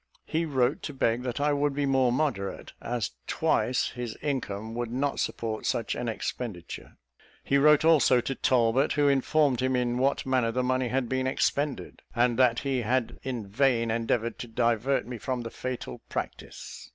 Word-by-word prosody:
He 165 +1 -1
wrote 135 -1 +1
to 145 - -6
beg 115 -2 +1
that 125 0 -3
I 145 +1 +2
would 145 0 0
be 145 0 0
more 130 -2 +3
moderate; 120 -8 -2
as 120 -2 -2 0.2
twice 125 - +1
his 120 -3 -6
income 115 -7 -3
would 120 0 -3
not 140 +3 -1
support 110 -2 -2
such 115 - 0
an 120 -1 -3
expenditure. 110 -5 -6 0.5
He 140 - +2
wrote 150 +1 +5
also 150 -6 +5
to 135 - -2
Talbot, 125 +1 +2
who 145 -1 +3
informed 140 -1 +2
him 130 0 +1
in 125 0 0
what 135 +2 +1
manner 130 -3 +1
the 125 +2 0
money 130 0 +1
had 125 0 -1
been 130 +1 -1
expended; 140 +1 -1
and 120 0 +2
that 125 -2 +4
he 135 -3 0
had 120 +1 -1
in 125 -5 -4
vain 115 +2 +1
endeavoured 115 0 -1
to 120 - -5
divert 120 +3 +1
me 120 -1 -7
from 125 +1 -2
the 115 -1 -6
fatal 125 - -5
practice. - - -6
125 Hz, 175 wpm, -28 LUFS, 115-135 Hz, 0.5 s, wrote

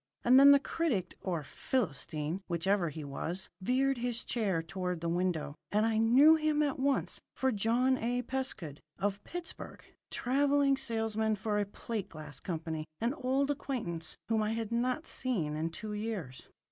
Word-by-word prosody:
And 255 +2 +7
then 280 +1 +9
the 280 - +9
critic 265 - -1
or 170 -5 -2
Philistine, 155 - -2
whichever 175 +1 +1
he 155 +1 -7
was, 165 +6 -4
veered 260 +5 +2
his 240 0 -2
chair 195 -8 0
toward 180 +1 -3
the 170 - -3
window, 170 -4 0 0.2
and 210 +2 +3
I 225 -1 +1
knew 255 +8 +7
him 305 -1 +2
at 280 -2 -1
once 275 +1 0
for 265 0 +1
John 240 +5 +2
A. 245 +2 -1
Pescud, 220 - -4 0.2
of 200 0 -1
Pittsburgh, 350 0 -7 0.3
travelling 280 +2 +2
salesman 220 -4 0
for 210 0 -1
a 205 - 0
plate 210 0 -5
glass 150 -3 -8
company 160 -3 -4
an 235 +3 0
old 275 0 +1
acquaintance 200 - -3
whom 225 -1 +2
I 215 +1 0
had 225 -1 -3
not 255 +6 0
seen 180 -13 -1
in 160 +2 -1
two 210 +5 -6
years. 205 - -5
220 Hz, 160 wpm, -32 LUFS, 175-260 Hz, 0.3 s, then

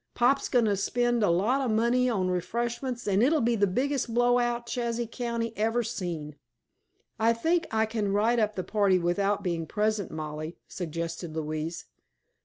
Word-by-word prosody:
Pop's 260 +3 +2
goin' 245 -3 +3
to 205 -2 +2
spend 240 +4 +1
a 205 - +3
lot 210 +11 +2
of 260 - 0
money 235 +3 +2
on 195 -6 0
refreshments 235 +7 -2
an' 200 0 +3
it'll 300 +6 +4
be 235 -1 +2
the 205 -2 +3
biggest 255 +5 -1
blow 245 +1 +3
out 240 0 -1
Chazy 235 0 -2
County 230 -1 -3
ever 225 +3 +1
seen!" 170 -10 -5 0.8
"I 225 +1 +4
think 330 +8 +1
I 220 0 +2
can 215 -2 -2
write 220 +4 +2
up 215 -1 +1
the 185 - -2
party 200 -3 +2
without 195 +4 0
being 170 -3 -2
present, 210 0 0
Mollie," 155 +1 -6
suggested 165 -1 -5
Louise. 155 +1 -4
220 Hz, 170 wpm, -28 LUFS, 180-240 Hz, 0.8 s, it'll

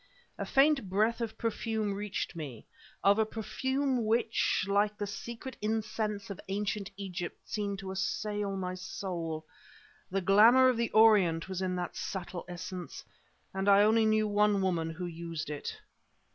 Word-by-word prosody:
A - - -2
faint 275 -6 +3
breath 215 +5 +1
of 230 -2 -3
perfume 220 -2 -1
reached 200 -2 -3
me 140 -9 -7 0.4
of 200 +2 +5
a - - +5
perfume 260 +4 -1
which, 225 -3 +1
like 205 +1 +2
the 205 - -2
secret 235 +5 -7
incense 215 -1 -2
of 195 - -7
Ancient 200 +1 -2
Egypt, 180 -3 -5
seemed 200 -2 -2
to 190 -1 -6
assail 195 +1 -2
my 185 -1 -3
soul. 175 -4 -5 0.6
The 195 - 0
glamour 225 +8 +7
of 250 - +1
the 235 0 0
Orient 200 -7 +5
was 190 -1 -4
in 185 -1 -1
that 180 -1 -4
subtle 180 -2 -5
essence; 180 0 -7 0.5
and 195 +1 0
I 200 +1 +7
only 220 +1 +4
knew 215 0 +3
one 205 0 +3
woman 170 -3 0
who 170 +3 -5
used 165 -3 -5
it. 145 - -5
200 Hz, 155 wpm, -31 LUFS, 185-220 Hz, 0.6 s, glamour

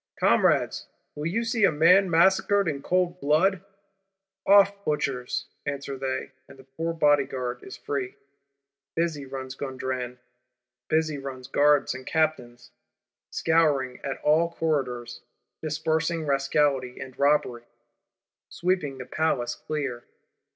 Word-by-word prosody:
'Comrades, - - +2 0.3
will 150 +2 -4
you 225 +7 -1
see 230 -1 0
a 195 - +6
man 180 +5 +5
massacred 190 +3 +3
in 140 -3 -2
cold 180 +2 0
blood?'—'Off, 195 +3 +1
butchers!' 135 -6 -2 0.2
answer 140 0 -4
they; 130 0 -3 0.2
and - - -15
the 130 - -15
poor 160 +6 -4
Bodyguard 140 -6 +1
is - - -10
free. 135 -3 -4 0.8
Busy 160 -4 -1
runs 130 -1 -6
Gondran, 130 -2 -4 0.7
busy 155 -2 0
run 135 -2 -7
Guards 145 -2 +3
and 130 0 -8
Captains; 125 -7 -1 0.6
scouring 145 -6 +1
at 135 - -3
all 160 +3 +3
corridors; 130 -7 -2 0.4
dispersing 160 +1 -1
Rascality 140 -2 +1
and 130 -1 -9
Robbery; 140 -4 +2 0.8
sweeping 170 -6 -1
the 130 - -7
Palace 125 -7 -1
clear. 135 -3 -4
150 Hz, 115 wpm, -26 LUFS, 130-170 Hz, 0.8 s, a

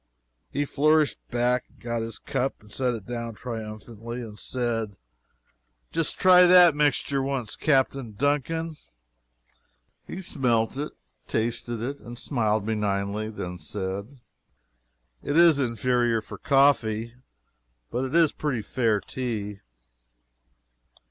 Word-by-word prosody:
He 145 +1 -1
flourished 155 +2 +2
back 120 +1 +1
and - - -26
got 115 -1 -3
his 115 0 -4
cup 135 +2 -2
and 105 -1 -19
set 125 0 0
it 105 -4 -8
down 115 -2 -5
triumphantly, 115 +1 -7
and 110 -2 -9
said: 115 -5 -2 0.9
"Just 165 - -1
try 180 -1 +7
that 175 -2 +8
mixture 145 -1 +1
once, 135 -4 -2
Captain 135 -5 +1
Duncan." 150 +6 -1 1.3
He - - -6
smelt 120 -8 +1
it 145 +2 -3 0.4
tasted 115 0 -2
it 120 -2 -6
smiled 110 -5 0
benignantly 105 -1 -1
then 90 -4 -6
said: 100 - -5 1.0
"It 145 - -1
is 170 -4 +7
inferior 120 -1 +1
for 110 - -10
coffee 120 -5 +3 0.8
but 125 - -1
it 135 +4 -3
is 165 -3 +5
pretty 130 -8 -2
fair 110 -2 +1
tea." 105 -6 -4
120 Hz, 115 wpm, -26 LUFS, 110-140 Hz, 1.3 s, that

